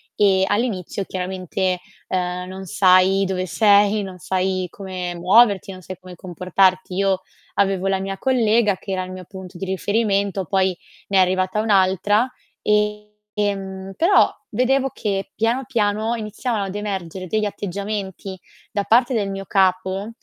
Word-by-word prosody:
e 195 Hz, -2 st, +4 dB
all'inizio 205 Hz, -3 st, -1 dB
chiaramente, 185 Hz, 0 st, -2 dB, 0.3 s
ehm, 180 Hz, 0 st, -2 dB
non 190 Hz, +1 st, -7 dB
sai 185 Hz, +2 st, +4 dB
dove 185 Hz, -1 st, -2 dB
sei, 205 Hz, +2 st, +4 dB
non 190 Hz, -2 st, -7 dB
sai 185 Hz, +1 st, -1 dB
come 185 Hz, -2 st, -5 dB
muoverti, 195 Hz, +3 st, +4 dB
non 185 Hz, -, -10 dB
sai 185 Hz, +2 st, -8 dB
come 185 Hz, -1 st, -11 dB
comportarti. 185 Hz, +1 st, +1 dB
Io 195 Hz, -1 st, +1 dB, 0.3 s
avevo 195 Hz, -1 st, +1 dB
la 195 Hz, 0 st, +1 dB
mia 195 Hz, 0 st, -4 dB
collega, 230 Hz, -4 st, +2 dB
che 195 Hz, -, -8 dB
era 185 Hz, -1 st, -1 dB
il 185 Hz, -, -8 dB
mio 185 Hz, 0 st, -8 dB
punto 185 Hz, -1 st, -10 dB
di 195 Hz, -, -3 dB
riferimento, 200 Hz, 0 st, 0 dB
poi 190 Hz, +1 st, +1 dB, 0.3 s
ne 195 Hz, -, +2 dB
è -, -, +7 dB
arrivata 185 Hz, +2 st, +1 dB
un'altra 205 Hz, +2 st, +3 dB, 0.4 s
e, 210 Hz, 0 st, 0 dB, 0.2 s
ehm, 195 Hz, -2 st, -3 dB
però 355 Hz, +5 st, +4 dB, 0.2 s
vedevo 270 Hz, +2 st, +2 dB
che 195 Hz, -3 st, -3 dB
piano 230 Hz, +4 st, 0 dB
piano 220 Hz, -2 st, 0 dB
iniziavano 220 Hz, 0 st, -3 dB
ad 195 Hz, 0 st, -6 dB
emergere 190 Hz, -3 st, -4 dB
degli 215 Hz, +3 st, 0 dB
atteggiamenti 200 Hz, -1 st, -5 dB, 0.3 s
da 205 Hz, -2 st, -1 dB
parte 240 Hz, +4 st, +3 dB
del 205 Hz, -4 st, 0 dB
mio 195 Hz, 0 st, -5 dB
capo 190 Hz, +2 st, +1 dB
195 Hz, 150 wpm, -21 LUFS, 185-210 Hz, 0.4 s, è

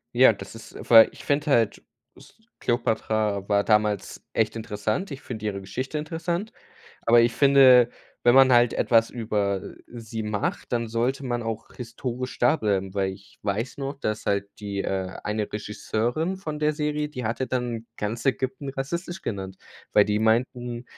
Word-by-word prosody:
Ja, -, -, +7 dB
das -, -, -10 dB
ist -, -, -12 dB
weil 115 Hz, -1 st, +9 dB
ich -, -, -13 dB
finde 145 Hz, +1 st, 0 dB
halt, 115 Hz, -5 st, +2 dB, 0.3 s
s -, -, -17 dB, 0.3 s
Kleopatra 110 Hz, -4 st, 0 dB
war 100 Hz, -1 st, +3 dB
damals 105 Hz, -2 st, 0 dB
echt 110 Hz, 0 st, +1 dB
interessant. 110 Hz, -, -3 dB
Ich 135 Hz, -, -7 dB
finde 110 Hz, -3 st, -7 dB
ihre 100 Hz, -2 st, -2 dB
Geschichte 130 Hz, +10 st, -4 dB
interessant, 170 Hz, +6 st, -3 dB, 0.6 s
aber 115 Hz, 0 st, +7 dB
ich 120 Hz, -, +2 dB
finde, 135 Hz, -3 st, +6 dB, 0.3 s
wenn 120 Hz, +1 st, +5 dB
man 135 Hz, -1 st, +7 dB
halt 120 Hz, -1 st, +5 dB
etwas 115 Hz, -1 st, +3 dB
über, 105 Hz, -4 st, -1 dB
äh, -, -, -9 dB, 0.2 s
sie 110 Hz, -1 st, -5 dB
macht, 105 Hz, +3 st, -3 dB
dann 115 Hz, -1 st, 0 dB
sollte 125 Hz, +5 st, -1 dB
man 120 Hz, -1 st, -2 dB
auch 115 Hz, -1 st, -5 dB
historisch 125 Hz, +1 st, -5 dB
da 120 Hz, +6 st, +4 dB
bleiben, 95 Hz, -5 st, -1 dB
weil 95 Hz, -1 st, -1 dB
ich 100 Hz, +1 st, -16 dB
weiß 105 Hz, +6 st, -2 dB
noch 140 Hz, 0 st, -4 dB
dass 110 Hz, -3 st, -3 dB
halt 100 Hz, 0 st, +1 dB
die, 100 Hz, -1 st, -3 dB
äh 95 Hz, -1 st, -2 dB, 0.2 s
eine 105 Hz, 0 st, -2 dB
Regisseurin 120 Hz, -, -2 dB
von 155 Hz, -5 st, -5 dB
der 150 Hz, 0 st, +1 dB
Serie, 150 Hz, 0 st, -1 dB
die 125 Hz, -5 st, -6 dB
hatte 120 Hz, +4 st, -1 dB
dann 120 Hz, -3 st, -3 dB
ganz 110 Hz, +5 st, -4 dB
Ägypten 135 Hz, +3 st, -1 dB
rassistisch 170 Hz, +7 st, -4 dB
genannt, 95 Hz, -3 st, -5 dB, 0.4 s
weil 105 Hz, -, +7 dB
die 105 Hz, +1 st, 0 dB
meinten, 120 Hz, +2 st, 0 dB
115 Hz, 170 wpm, -25 LUFS, 105-135 Hz, 0.6 s, weil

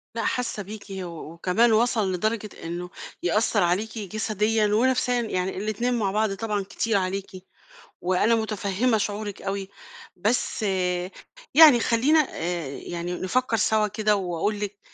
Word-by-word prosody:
لا 230 Hz, -, -2 dB
حاسّة 240 Hz, -4 st, -2 dB
بيكِ، 210 Hz, +2 st, -9 dB
و 190 Hz, -1 st, -5 dB, 0.3 s
وكمان 185 Hz, +8 st, +2 dB
وصَل 220 Hz, -4 st, +2 dB
لدرجة 215 Hz, +3 st, -1 dB
إنّه 175 Hz, +2 st, -5 dB, 0.3 s
يأثّر 210 Hz, +2 st, +2 dB
عليكِ 200 Hz, +6 st, 0 dB
جسديًا 215 Hz, +1 st, 0 dB
ونفسيًا، 245 Hz, +3 st, +2 dB
يعني 185 Hz, -5 st, -2 dB
الإتنين 215 Hz, +5 st, -1 dB
مع 205 Hz, -5 st, 0 dB
بعض 215 Hz, -1 st, +1 dB
طبعًا 210 Hz, 0 st, -2 dB
كتير 205 Hz, +2 st, -1 dB
عليكِ، 190 Hz, +1 st, -2 dB, 0.7 s
وأنا 185 Hz, +6 st, +2 dB
متفهِّمة 220 Hz, +1 st, 0 dB
شعورِك 205 Hz, 0 st, -4 dB
أوي. 195 Hz, 0 st, -3 dB, 0.5 s
بس 215 Hz, +4 st, 0 dB, 0.9 s
يعني 295 Hz, -6 st, +9 dB
خلّينا 275 Hz, +8 st, +3 dB
آآ، 170 Hz, -3 st, -3 dB
يعني 170 Hz, +5 st, -5 dB
نفكّر 230 Hz, +6 st, 0 dB
سوا 215 Hz, 0 st, +2 dB
كده، 210 Hz, +1 st, +1 dB
وأقول 195 Hz, +2 st, -2 dB
لك 205 Hz, -1 st, -4 dB
210 Hz, 135 wpm, -25 LUFS, 190-225 Hz, 0.9 s, يعني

